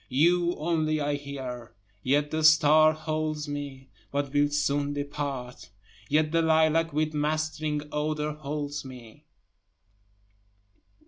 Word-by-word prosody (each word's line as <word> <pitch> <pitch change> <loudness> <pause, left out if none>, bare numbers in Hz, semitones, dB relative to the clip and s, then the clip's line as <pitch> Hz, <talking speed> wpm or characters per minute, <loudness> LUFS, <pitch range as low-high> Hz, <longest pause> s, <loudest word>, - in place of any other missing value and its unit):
You 175 +6 +3
only 155 -1 0
I 145 0 0
hear 130 -4 -6 0.3
yet 145 +4 +1
the 155 0 -1
star 155 0 +6
holds 155 -1 -3
me, 140 -2 -6 0.2
(but 140 -1 -2
will 145 0 +3
soon 145 0 0
depart,) 140 -3 -5 0.4
Yet 155 +1 +2
the 165 0 +3
lilac 160 0 +3
with 155 +1 -1
mastering 155 0 -1
odor 150 0 -1
holds 150 -1 -5
me. 125 -4 -12
150 Hz, 115 wpm, -27 LUFS, 145-155 Hz, 0.4 s, star